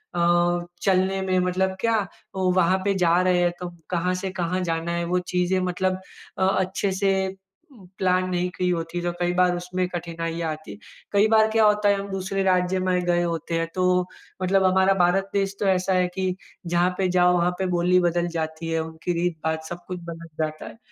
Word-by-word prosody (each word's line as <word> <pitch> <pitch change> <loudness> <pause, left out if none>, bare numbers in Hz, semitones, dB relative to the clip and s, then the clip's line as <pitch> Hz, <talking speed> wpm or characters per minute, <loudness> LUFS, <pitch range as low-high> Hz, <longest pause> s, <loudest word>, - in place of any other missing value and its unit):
अ, 175 0 +2 0.2
चलने 190 0 +2
में 185 -1 0
मतलब 185 +1 0
क्या 225 -4 +1 0.3
ओ, 185 -1 +1
वहाँ 185 0 +3
पे 200 - +2
जा 170 +2 +4
रहे 180 -1 +2
हैं 175 0 +2
तो 180 -1 -5 0.2
कहाँ 180 +1 0
से 190 - -2
कहाँ 180 +2 -1
जाना 165 +1 -1
है? 170 0 -1
वो 180 +1 +1
चीज़ें 180 +1 0
मतलब 185 +1 -1 0.4
अ, - - +2
अच्छे 190 +1 0
से 190 -1 +1 0.6
प्लान 185 -1 +2
नहीं 180 0 0
की 180 0 +1
होती 170 0 -2
तो 175 0 -1
कई 175 0 +1
बार 180 0 +3
उसमें 180 +1 -2
कठिनाइयाँ 165 -1 -3
आती। 155 -9 -8 0.4
कई 205 +1 +4
बार 220 0 +5
क्या 220 0 +4
होता 210 0 +3
है 200 - +4
हम 200 0 -6
दूसरे 195 0 -2
राज्य 185 0 +2
में 180 0 +2
गए 175 0 +2
होते 165 -1 -2
हैं 165 - -1
तो, 180 0 +2 0.4
मतलब 190 +1 +3
हमारा 190 +1 +4
भारत 195 +3 +2
देश 195 -1 0
तो - - +1
ऐसा 190 0 +2
है 180 -1 +2
कि, 185 -1 -1 0.3
जहाँ 175 +1 +2
पे 190 - +2
जाओ 180 0 +5
वहाँ 175 +1 +2
पे 190 - 0
बोली 180 +1 +3
बदल 175 0 -1
जाती 160 +1 -4
है, 165 - +1
उनकी 160 +2 -4
रीत, 175 -2 -1
बात, 160 0 -1
सब 175 +2 -8
कुछ 180 -1 -4
बदल 165 0 -8 0.2
जाता 155 0 -5
है। - - -11
180 Hz, 205 wpm, -24 LUFS, 175-190 Hz, 0.6 s, बार